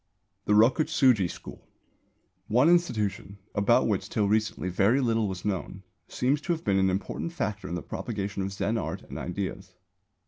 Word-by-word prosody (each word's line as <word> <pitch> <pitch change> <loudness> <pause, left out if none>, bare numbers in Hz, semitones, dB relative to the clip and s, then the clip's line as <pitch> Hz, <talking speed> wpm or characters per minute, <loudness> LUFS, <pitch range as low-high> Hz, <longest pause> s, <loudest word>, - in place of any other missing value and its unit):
THE 105 - +2
ROKUTSŪJI 125 - +4
SCHOOL. - - -10 0.9
One 125 +8 +4
institution, 105 - 0 0.2
about 100 -1 +3
which - - -1
till 105 -2 +1
recently 110 -2 0
very 100 +8 +3
little 115 -4 +1
was 95 -2 -6
known, 95 -1 -3 0.2
seems 140 +4 0
to 175 - 0
have 160 - -6
been 95 -1 +2
an 95 0 +3
important 95 - -3
factor 105 - -3
in 85 - -4
the 90 - -5
propagation 100 - -4
of 95 +1 -3
Zen 100 +3 -1
art - - -5
and - - -8
ideas. 95 +1 -5
105 Hz, 165 wpm, -27 LUFS, 95-125 Hz, 0.9 s, ROKUTSŪJI